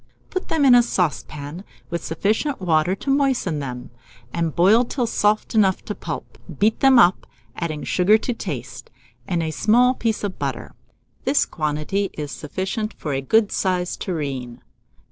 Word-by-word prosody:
Put 370 - -3
them 310 -3 +1
in 260 - +7
a 245 - +8
saucepan, 150 - -3 0.3
with 170 -1 -3
sufficient 215 - -1
water 175 0 +2
to 275 - -3
moisten 265 - +1
them, 125 -4 -6 0.4
and 165 -2 -1
boil 200 +7 +5
till 250 0 -2
soft 215 -1 +1
enough 195 -4 +2
to 210 - -3
pulp. - - -7 0.2
Beat 215 +2 +2
them 270 -1 +6
up, 185 -6 +4 0.3
adding 155 -3 -4
sugar 195 +4 +4
to 245 +3 -3
taste, 135 - -6 0.4
and 170 -2 0
a 160 - -2
small 245 +9 +4
piece 225 -4 -2
of 200 -2 -4
butter - - -4 0.5
This 280 +2 +3
quantity 155 +6 -2
is 150 -1 -5
sufficient 190 +7 -4
for 150 - -4
a 135 - -1
good 210 +9 +2
sized 180 -2 -1
tureen. 135 -8 -4
185 Hz, 160 wpm, -22 LUFS, 155-225 Hz, 0.5 s, a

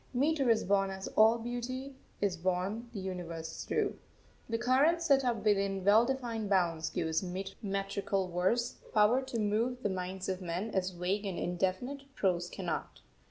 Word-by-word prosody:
Metre 280 0 +2
is 225 -1 +4
born 195 0 +2
as 190 0 -5
all 220 +2 +5
beauty 245 +3 -4 0.3
is 200 -3 +1
born 185 +6 -1
the 220 - -5
universe 175 -4 -5
through. - - 0 0.5
The 230 - 0
current 265 +8 +3
set 280 -5 +3
up 240 -3 -1
within 195 -2 +2
well 220 +4 +6
defined 235 -5 -2
bounds 170 -4 +2
gives 160 -1 0 0.4
metrical 195 -1 -1
verse 210 +8 +1 0.2
power 215 +5 +5
to 260 -3 -4
move 230 +4 0
the 205 - +1
minds 185 0 -4
of 185 0 -2
men 180 +5 -3
as 190 -2 0
vague 185 +3 -2
and 185 - -3
indefinite 190 +11 -2
prose 175 -2 +1
cannot. - - -4
200 Hz, 160 wpm, -32 LUFS, 185-240 Hz, 0.5 s, well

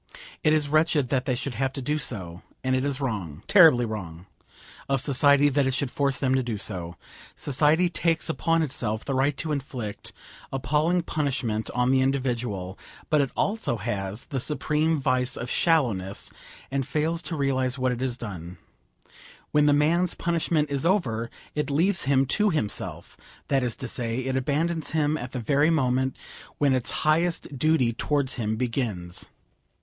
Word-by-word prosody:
It 155 - +4
is 155 -2 +2
wretched 155 -3 +2
that 130 -2 0
they 130 - 0
should 135 +1 -4
have 135 +3 -1
to 140 - -5
do 150 +4 0
so, 95 - -5 0.2
and 130 0 +1
it 130 - 0
is 140 -1 -1
wrong, 100 - -4
terribly 160 -11 +6
wrong, 90 -6 -6 0.6
of 135 0 +2
society 140 +1 +4
that 140 -1 +2
it 130 - 0
should 135 -2 -2
force 140 -2 0
them 130 -1 +1
to 130 - +3
do 120 -4 -3
so. 90 -4 -4 0.4
Society 150 +5 +3
takes 170 -1 0
upon 165 0 +1
itself 115 -7 -1
the 140 - -2
right 135 +2 +1
to 160 - -3
inflict 130 -7 -5 0.4
appalling 155 +6 +1
punishment 130 -9 -2
on 125 +1 +2
the 135 0 +4
individual, 120 -8 -2 0.3
but 150 -2 +5
it 135 - 0
also 205 - 0
has 105 -1 -4
the 135 - -3
supreme 155 +3 0
vice 130 -1 0
of 125 - -4
shallowness, 115 - +1 0.4
and 135 -1 -1
fails 160 +2 0
to 165 - -4
realise 130 -2 0
what 130 -1 +1
it 120 - -3
has 130 -2 -2
done. 90 -7 -7 0.9
When 150 0 +4
the - - +5
man's 160 +5 +2
punishment 165 -3 0
is 140 -1 -1
over, 120 - +1 0.2
it 150 -1 -2
leaves 175 +5 +1
him 135 0 +3
to 210 +10 +2
himself; 130 - -3 0.3
that 135 -1 +3
is 120 -3 -1
to 130 - -5
say, 120 0 -2
it 130 0 -1
abandons 155 +5 0
him 155 -1 +2
at 125 -4 -5
the 130 - -4
very 145 +6 +2
moment 130 -4 +1 0.4
when 140 -2 +3
its 130 -2 0 0.2
highest 165 -1 +1
duty 135 -4 +2
towards 140 +2 0
him 110 -2 -2
begins. 110 -8 -3
135 Hz, 170 wpm, -26 LUFS, 120-150 Hz, 0.9 s, terribly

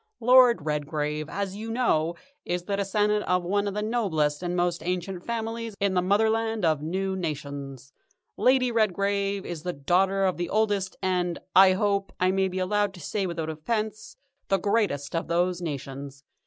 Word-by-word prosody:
Lord 245 - +6
Redgrave, 150 0 -2
as 200 -1 -3
you 220 +2 -6
know, 175 -9 +1 0.3
is 175 0 -2
the 200 +2 -2
descendant 210 +1 +1
of 180 0 +1
one 200 +3 0
of 200 - -3
the 210 - -1
noblest 170 -10 0
and 175 0 -2
most 175 -1 0
ancient 180 +1 -3
families 230 -1 -4
in 200 -2 +1
the 180 - +2
Motherland 220 +2 +1
of 155 -3 +2
New 190 +5 -2
Nations. 140 -5 -5 0.4
Lady 255 -1 +3
Redgrave 200 -2 0
is 170 -3 -5
the 180 +1 -3
daughter 190 +7 +2
of 185 - 0
the 175 0 -3
oldest 205 -3 0
and, 180 -2 0 0.2
I 190 0 +8
hope 200 0 0
I 185 0 +3
may 190 0 +1
be 185 0 -5
allowed 200 +1 0
to - - -11
say 195 +4 -2
without 165 -2 -3
offence, 215 - -3 0.3
the 195 - +3
greatest 195 -8 0
of 165 - -1
those 175 +1 0
nations. 140 -3 -6
190 Hz, 170 wpm, -26 LUFS, 165-205 Hz, 0.4 s, I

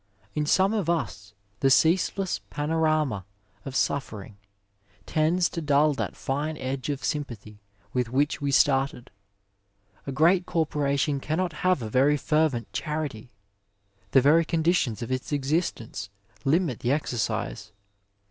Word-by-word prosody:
In 150 0 -1
some 190 +6 +3
of 200 -7 -1
us 105 -11 -3 0.2
the 135 - +3
ceaseless 180 +6 +2
panorama 155 -7 0 0.4
of 135 -1 -6
suffering 110 -9 -2 0.7
tends 165 +3 +2
to 170 - -5
dull 145 0 +3
that 140 - -4
fine 150 +3 -2
edge 130 +1 -4
of 140 -1 -3
sympathy 115 -8 -4 0.3
with 125 -2 0
which 140 +4 0
we 140 - 0
started. 135 -2 +2 1.0
A - - -2
great 175 +6 +3
corporation 145 -3 0
cannot 165 +5 -1
have 180 -8 +2
a 110 - -4
very 140 +4 +4
fervent 150 -7 0
charity; 150 -7 -4 0.8
the 135 - +5
very 155 +5 +5
conditions 160 - +1
of 115 - -6
its 130 +2 -3
existence 145 - -2 0.4
limit 155 -3 +1
the 125 - 0
exercise. 115 -7 -2
145 Hz, 130 wpm, -26 LUFS, 130-160 Hz, 1.0 s, the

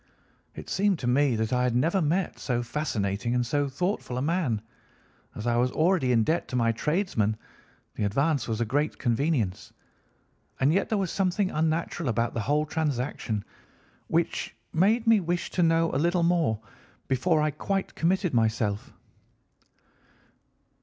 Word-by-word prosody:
"It - - -9
seemed 200 -1 +1
to 130 - -6
me 130 0 +3
that 110 +2 -1
I 125 - +2
had 125 -1 +1
never 165 +9 +2
met 170 +5 0
so 120 -2 -1
fascinating 120 -5 -2
and 125 -1 +1
so 145 +3 0
thoughtful 160 -3 -2
a - - -1
man. 155 - 0 0.8
As 105 - -6
I 120 0 +2
was 125 +1 +2
already 160 -5 +2
in 115 -2 +4
debt 160 +8 0
to - - -5
my 115 -2 +3
tradesmen, 115 - 0 0.6
the - - -3
advance 135 +4 +1
was 110 -1 -2
a 120 - +1
great 145 +7 -1
convenience, 120 - -1 0.9
and 135 +4 +3
yet 195 +2 +1
there 220 - +1
was 190 -3 -1
something 190 0 0
unnatural 160 -1 -1
about 115 +1 0
the 115 - -2
whole 150 +6 +1
transaction 135 -8 -2 0.6
which 165 +1 -1 0.2
made 215 +8 +3
me 225 -2 +5
wish 175 -1 -2
to 180 - 0
know 165 0 +3
a 130 - +1
little 175 +1 +2
more 165 -11 +2 0.5
before 155 +5 +2
I 150 0 +1
quite 195 +6 -2
committed 180 0 0
myself. 110 -3 0
145 Hz, 160 wpm, -27 LUFS, 120-170 Hz, 0.9 s, me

